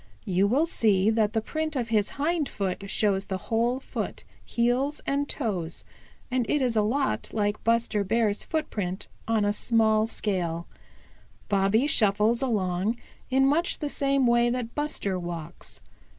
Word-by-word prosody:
You 190 Hz, +1 st, +2 dB
will 270 Hz, +9 st, +3 dB
see 215 Hz, -, +2 dB
that 220 Hz, -1 st, +1 dB
the 225 Hz, -, +1 dB
print 310 Hz, +4 st, -3 dB
of 240 Hz, -3 st, -2 dB
his 210 Hz, -3 st, +2 dB
hind 305 Hz, 0 st, 0 dB
foot 195 Hz, 0 st, -3 dB
shows 200 Hz, -2 st, +1 dB
the 190 Hz, -, -2 dB
whole 235 Hz, +6 st, 0 dB
foot, -, -, -5 dB, 0.2 s
heels 250 Hz, +5 st, 0 dB
and 280 Hz, +1 st, 0 dB
toes, 190 Hz, -, -3 dB, 0.5 s
and 255 Hz, -1 st, +2 dB
is 255 Hz, -2 st, +1 dB
a 215 Hz, -, +4 dB
lot 265 Hz, +6 st, 0 dB
like 205 Hz, -1 st, -1 dB
Buster 230 Hz, -2 st, +2 dB
Bear's 215 Hz, 0 st, +1 dB
footprint 210 Hz, -, -3 dB, 0.2 s
on 225 Hz, -2 st, +2 dB
a 205 Hz, -, +2 dB
small 220 Hz, -1 st, +2 dB
scale. 175 Hz, -7 st, -2 dB, 0.8 s
Bobby 200 Hz, +5 st, +3 dB
shuffles 220 Hz, -2 st, +3 dB
along 205 Hz, -3 st, 0 dB, 0.3 s
in 265 Hz, +1 st, +3 dB
much 315 Hz, +6 st, +2 dB
the 295 Hz, -, -3 dB
same 275 Hz, -2 st, +1 dB
way 240 Hz, 0 st, +4 dB
that 240 Hz, -1 st, -3 dB
Buster 250 Hz, -11 st, -2 dB
walks. 170 Hz, -3 st, -7 dB
225 Hz, 150 wpm, -27 LUFS, 200-260 Hz, 0.8 s, a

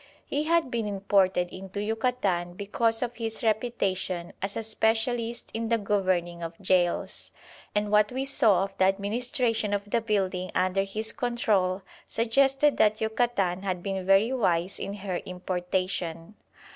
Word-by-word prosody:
He 295 Hz, +2 st, -1 dB
had 330 Hz, -5 st, +2 dB
been 230 Hz, -3 st, -1 dB
imported 195 Hz, -3 st, +1 dB
into 195 Hz, +1 st, -7 dB
Yucatan 210 Hz, -5 st, 0 dB
because 225 Hz, +4 st, 0 dB
of 240 Hz, -1 st, -4 dB
his 225 Hz, -1 st, -2 dB
reputation 195 Hz, -6 st, -1 dB
as 195 Hz, +1 st, -3 dB
a 225 Hz, -, -2 dB
specialist 225 Hz, +2 st, 0 dB
in 225 Hz, 0 st, -2 dB
the 230 Hz, -, +3 dB
governing 185 Hz, -4 st, 0 dB
of 165 Hz, 0 st, -6 dB
gaols, 185 Hz, -3 st, 0 dB, 0.4 s
and 210 Hz, 0 st, 0 dB
what 210 Hz, +1 st, +4 dB
we 260 Hz, +2 st, -2 dB
saw 225 Hz, -9 st, +4 dB
of 195 Hz, 0 st, -6 dB
the 190 Hz, -, +5 dB
administration 220 Hz, +2 st, 0 dB
of 200 Hz, 0 st, -4 dB
the 230 Hz, +3 st, +1 dB
building 190 Hz, -4 st, -1 dB
under 185 Hz, +1 st, +2 dB
his 215 Hz, +3 st, -3 dB
control 205 Hz, -6 st, 0 dB, 0.3 s
suggested 270 Hz, +5 st, +3 dB
that 215 Hz, 0 st, +3 dB
Yucatan 220 Hz, -5 st, 0 dB
had 185 Hz, -3 st, -3 dB
been 195 Hz, -1 st, -2 dB
very 195 Hz, +6 st, +4 dB
wise 180 Hz, -6 st, +1 dB
in 200 Hz, -, -4 dB
her 190 Hz, -3 st, -3 dB
importation. 180 Hz, -1 st, -3 dB
205 Hz, 145 wpm, -27 LUFS, 185-230 Hz, 0.4 s, the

